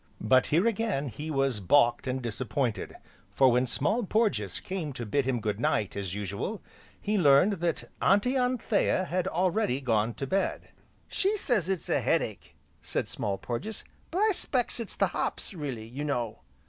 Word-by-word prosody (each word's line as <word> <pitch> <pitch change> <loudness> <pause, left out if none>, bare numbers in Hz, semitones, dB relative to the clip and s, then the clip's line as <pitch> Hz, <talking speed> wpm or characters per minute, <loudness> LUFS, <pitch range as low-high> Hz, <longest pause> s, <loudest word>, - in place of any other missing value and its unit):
But 130 +4 +4
here 170 +7 +3
again 215 - 0
he 150 +8 -6
was 135 -6 +1
balked 120 +6 +3
and 130 0 -2
disappointed, 120 +1 -2 0.4
for 130 -2 +5
when 125 +1 +2
Small 205 - 0
Porges 200 - 0
came 180 -7 -4
to 120 -2 -5
bid 135 +5 0
him 130 -2 0
good 105 -1 -2
night 105 -4 0
as 100 -2 -4
usual, 105 - -3 0.4
he 210 0 0
learned 145 +5 +6
that 170 -1 -1 0.2
"Auntie 205 +7 +3
Anthea" 250 -7 +1
had 185 +1 -1
already 180 - +1
gone 115 -3 +1
to 135 - -3
bed. 190 +7 -1 0.4
"She 400 +3 0
says 215 - 0
it's 190 -4 -2
a - - +1
head - - +2
ache," - - -8 0.3
said - - -2
Small 100 -2 -2
Porges, 160 - -5 0.3
"but 365 +4 -1
I 435 - +4
'specks 255 - -1
it's 230 - -4
the - - +3
hops, - - -3
really, 135 -10 -5
you 130 +6 -6
know." 120 -7 -2
145 Hz, 175 wpm, -28 LUFS, -, 0.4 s, learned